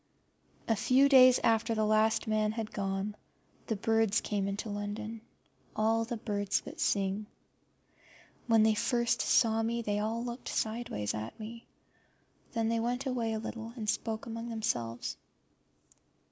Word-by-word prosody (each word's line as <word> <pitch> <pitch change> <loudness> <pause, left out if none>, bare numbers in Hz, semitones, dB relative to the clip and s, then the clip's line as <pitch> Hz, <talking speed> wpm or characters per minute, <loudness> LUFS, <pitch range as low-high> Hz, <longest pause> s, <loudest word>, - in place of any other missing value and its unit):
A 225 - +3
few 255 +6 +4
days 255 -2 +7
after 225 0 +2
the 215 0 +1
last 215 +1 +2
man 215 0 +1
had 220 -1 -4
gone 195 +1 -2 0.5
the 225 - 0
birds 225 0 +2
came 200 -2 -2
into 200 +3 -3
London, 210 +2 -5 0.5
all 225 +1 +2
the 235 +1 -4
birds 205 -2 -1
that - - -10
sing. 200 +1 0 1.2
When 225 -2 +5
they 220 0 +4
first 235 +2 +1
saws 225 -1 +3
me 235 +1 -1
they 205 -1 -1
all 225 +3 -2
looked 240 +1 -6
sideways 220 - -2
at 110 - -6
me, 230 +2 -8 0.9
then 225 -2 0
they 230 0 +1
went 245 +4 -1
away 240 -4 -1
a - - -1
little 225 +1 -6
and 220 -4 -5
spoke 220 +1 -1
among 230 +1 -5
themselves. 120 - -2
220 Hz, 145 wpm, -31 LUFS, 210-230 Hz, 1.2 s, days